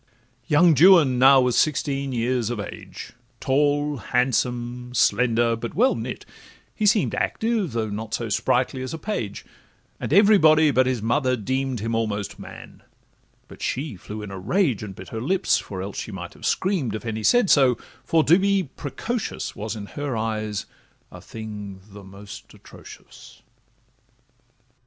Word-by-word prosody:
Young 160 Hz, +2 st, +5 dB
Juan 155 Hz, -5 st, +6 dB
now 135 Hz, +1 st, +7 dB
was 125 Hz, -2 st, +1 dB
sixteen 140 Hz, -2 st, 0 dB
years 120 Hz, -1 st, -1 dB
of 120 Hz, -3 st, -3 dB
age, 100 Hz, -, -8 dB, 0.3 s
Tall, 145 Hz, +1 st, +1 dB
handsome, 125 Hz, 0 st, -1 dB
slender, 115 Hz, -1 st, +2 dB
but 115 Hz, +1 st, -6 dB
well 255 Hz, +6 st, +4 dB
knit: -, -, -6 dB, 0.5 s
he 215 Hz, -, 0 dB
seem'd 210 Hz, 0 st, +2 dB
Active, 220 Hz, -, -1 dB
though 110 Hz, -2 st, -2 dB
not 110 Hz, +2 st, -4 dB
so 115 Hz, -, -4 dB
sprightly, 125 Hz, +5 st, 0 dB
as 130 Hz, +5 st, -5 dB
a -, -, -6 dB
page; 130 Hz, -, -4 dB, 0.5 s
And -, -, -5 dB
everybody 160 Hz, -6 st, +5 dB
but 130 Hz, -1 st, +3 dB
his 125 Hz, -4 st, -1 dB
mother 130 Hz, +2 st, +1 dB
deem'd 130 Hz, +1 st, -2 dB
Him 115 Hz, +1 st, -2 dB
almost 105 Hz, -3 st, -2 dB
man; -, -, -11 dB, 0.7 s
but -, -, -14 dB
she 135 Hz, -2 st, -3 dB
flew 105 Hz, +4 st, -8 dB
in 100 Hz, -, -8 dB
a 95 Hz, -, -7 dB
rage 130 Hz, -, 0 dB
And 100 Hz, -3 st, -7 dB
bit 95 Hz, -1 st, -11 dB
her 110 Hz, -, -5 dB
lips 185 Hz, +9 st, +1 dB
(for 95 Hz, -2 st, -6 dB
else 100 Hz, +1 st, -6 dB
she -, -, -6 dB
might 90 Hz, -3 st, -7 dB
have -, -, -5 dB
scream'd) 180 Hz, -, 0 dB
If 110 Hz, -, -7 dB
any 110 Hz, -1 st, -3 dB
said 240 Hz, -, +3 dB
so, 130 Hz, -4 st, +5 dB, 0.3 s
for 160 Hz, -1 st, +2 dB
to 170 Hz, +5 st, +5 dB
be 200 Hz, 0 st, +2 dB
precocious 225 Hz, -, -4 dB
Was 110 Hz, +2 st, -5 dB
in 105 Hz, -2 st, -7 dB
her 140 Hz, +1 st, -4 dB
eyes 110 Hz, -2 st, -3 dB, 0.5 s
a -, -, -11 dB
thing 105 Hz, -3 st, -8 dB
the 100 Hz, 0 st, -11 dB
most 100 Hz, +1 st, -12 dB
atrocious. -, -, -15 dB
125 Hz, 160 wpm, -23 LUFS, 110-150 Hz, 0.7 s, now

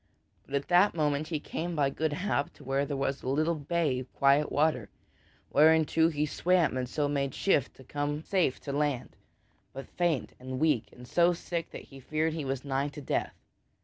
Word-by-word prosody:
But 140 Hz, -, -4 dB
at 140 Hz, -, -1 dB
that 180 Hz, +2 st, +5 dB
moment 150 Hz, -1 st, 0 dB
he 155 Hz, -2 st, -2 dB
came 170 Hz, +3 st, -4 dB
by 140 Hz, -3 st, +2 dB
good 155 Hz, +1 st, -1 dB
hap 150 Hz, -2 st, -1 dB
to -, -, -16 dB
where 135 Hz, +1 st, 0 dB
was 140 Hz, -1 st, -2 dB
a -, -, -7 dB
little 155 Hz, +5 st, +1 dB
bay 155 Hz, -3 st, 0 dB
of 130 Hz, 0 st, -9 dB
quiet 140 Hz, +2 st, +3 dB
water, 145 Hz, -7 st, +1 dB, 0.6 s
whereinto 160 Hz, +1 st, +5 dB
he 150 Hz, -2 st, 0 dB
swam 175 Hz, 0 st, +2 dB
and 125 Hz, -1 st, -2 dB
so 145 Hz, 0 st, 0 dB
made 140 Hz, -2 st, -1 dB
shift 145 Hz, -9 st, +1 dB
to 130 Hz, -, -14 dB
come 145 Hz, +3 st, -3 dB
safe 180 Hz, -9 st, +1 dB
to 140 Hz, -, -5 dB
land 145 Hz, -3 st, -1 dB, 0.6 s
but 135 Hz, +1 st, -7 dB
faint 170 Hz, -6 st, -1 dB
and 130 Hz, 0 st, -5 dB
weak, 135 Hz, -9 st, +1 dB
and 125 Hz, 0 st, -13 dB
so 175 Hz, +4 st, +3 dB
sick 170 Hz, -1 st, -4 dB
that -, -, -9 dB
he 135 Hz, -, -13 dB
feared 155 Hz, +4 st, -1 dB
that -, -, -5 dB
he 150 Hz, -, -3 dB
was 135 Hz, 0 st, -3 dB
nigh 135 Hz, 0 st, 0 dB
to 145 Hz, +1 st, -8 dB
death. -, -, -2 dB
145 Hz, 200 wpm, -29 LUFS, 135-160 Hz, 0.6 s, that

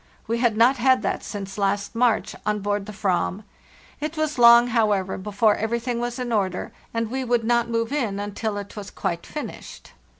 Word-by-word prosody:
We 230 Hz, +1 st, -1 dB
had 235 Hz, -3 st, +2 dB
not 245 Hz, +4 st, +5 dB
had 260 Hz, +1 st, +3 dB
that -, -, -1 dB
since 195 Hz, -1 st, -6 dB
last 200 Hz, +2 st, 0 dB
March, 230 Hz, -2 st, +1 dB
on 210 Hz, 0 st, -1 dB
board 205 Hz, 0 st, -1 dB
the -, -, -6 dB
/ram. 195 Hz, -1 st, -1 dB, 0.6 s
It 305 Hz, +2 st, -4 dB
was 310 Hz, -3 st, -1 dB
long, 235 Hz, 0 st, +8 dB
however, 210 Hz, -5 st, +1 dB
before 210 Hz, +2 st, +1 dB
everything 235 Hz, +2 st, -2 dB
was 240 Hz, +1 st, -3 dB
in 250 Hz, -2 st, -3 dB
order, 190 Hz, -4 st, -1 dB, 0.2 s
and 230 Hz, -1 st, -2 dB
we 265 Hz, +1 st, -2 dB
would 240 Hz, -2 st, +1 dB
not 235 Hz, +1 st, +1 dB
move 230 Hz, +2 st, -1 dB
in 225 Hz, -9 st, -1 dB
until 205 Hz, +1 st, -3 dB
it 200 Hz, +2 st, -7 dB
was 205 Hz, -2 st, -7 dB
quite 170 Hz, 0 st, -4 dB
finished. 300 Hz, -, -8 dB
225 Hz, 190 wpm, -24 LUFS, 205-240 Hz, 0.6 s, long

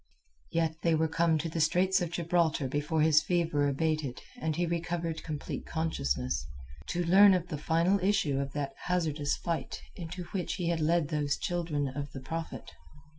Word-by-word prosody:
Yet 160 Hz, -1 st, 0 dB
they 165 Hz, -1 st, +3 dB
were 160 Hz, +1 st, +2 dB
come 165 Hz, 0 st, +2 dB
to 165 Hz, -, -2 dB
the 165 Hz, 0 st, -2 dB
straits 185 Hz, +5 st, +3 dB
of 175 Hz, -, -1 dB
Gibraltar 170 Hz, -4 st, +1 dB
before 150 Hz, +4 st, 0 dB
his 155 Hz, -1 st, +5 dB
fever 165 Hz, -5 st, +1 dB
abated 150 Hz, -2 st, -1 dB, 0.2 s
and 160 Hz, -6 st, -1 dB
he 175 Hz, +2 st, +1 dB
recovered 170 Hz, -1 st, -2 dB
complete 150 Hz, -3 st, -5 dB
consciousness, 65 Hz, -, -1 dB, 0.4 s
to 175 Hz, 0 st, -1 dB
learn 195 Hz, +3 st, +7 dB
of 180 Hz, -1 st, -2 dB
the 150 Hz, -, -3 dB
final 170 Hz, +6 st, +2 dB
issue 180 Hz, -8 st, +1 dB
of 140 Hz, 0 st, -3 dB
that 140 Hz, -2 st, -3 dB
hazardous 155 Hz, -5 st, 0 dB
fight 170 Hz, -1 st, -3 dB, 0.2 s
into 180 Hz, +1 st, -6 dB
which 185 Hz, -3 st, -2 dB
he 175 Hz, -3 st, -1 dB
had 170 Hz, -1 st, 0 dB
led 160 Hz, -1 st, +2 dB
those 145 Hz, -2 st, 0 dB
children 165 Hz, -5 st, -1 dB
of 140 Hz, +1 st, -5 dB
the 135 Hz, -, -6 dB
Prophet. 165 Hz, +5 st, -6 dB
160 Hz, 175 wpm, -30 LUFS, 150-170 Hz, 0.4 s, learn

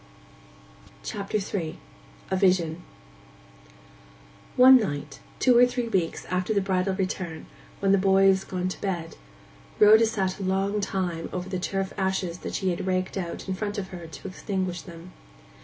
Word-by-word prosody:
CHAPTER 200 Hz, +1 st, -3 dB
III—A -, -, -6 dB
VISION 180 Hz, -3 st, +2 dB, 1.7 s
One 260 Hz, +1 st, +9 dB
night, 145 Hz, -, -3 dB, 0.2 s
two 250 Hz, -2 st, +4 dB
or 245 Hz, +1 st, +7 dB
three 245 Hz, -1 st, -3 dB
weeks 185 Hz, -6 st, -1 dB
after 185 Hz, +4 st, -1 dB
the -, -, +4 dB
bridal 190 Hz, 0 st, 0 dB
return, 185 Hz, -4 st, -3 dB, 0.4 s
when 195 Hz, -1 st, +3 dB
the 195 Hz, -, +5 dB
boy 195 Hz, 0 st, +4 dB
was 190 Hz, 0 st, +3 dB
gone 185 Hz, -1 st, -3 dB
to -, -, -7 dB
bed, 175 Hz, -5 st, -3 dB, 0.6 s
Rhoda 220 Hz, +2 st, +7 dB
sat 195 Hz, -3 st, -2 dB
a -, -, -4 dB
long 195 Hz, +2 st, 0 dB
time 180 Hz, -4 st, -2 dB
over 180 Hz, 0 st, -4 dB
the 185 Hz, -1 st, -2 dB
turf 195 Hz, +1 st, -2 dB
ashes 190 Hz, -2 st, -1 dB
that -, -, -5 dB
she 190 Hz, -2 st, 0 dB
had 175 Hz, +2 st, -4 dB
raked 185 Hz, 0 st, -1 dB
out 180 Hz, -2 st, -5 dB
in 190 Hz, -, -1 dB
front 205 Hz, +2 st, -4 dB
of 190 Hz, -2 st, -4 dB
her 175 Hz, -3 st, -8 dB
to 160 Hz, +4 st, -9 dB
extinguish 185 Hz, -1 st, -3 dB
them. 170 Hz, 0 st, -12 dB
190 Hz, 155 wpm, -26 LUFS, 180-200 Hz, 1.7 s, One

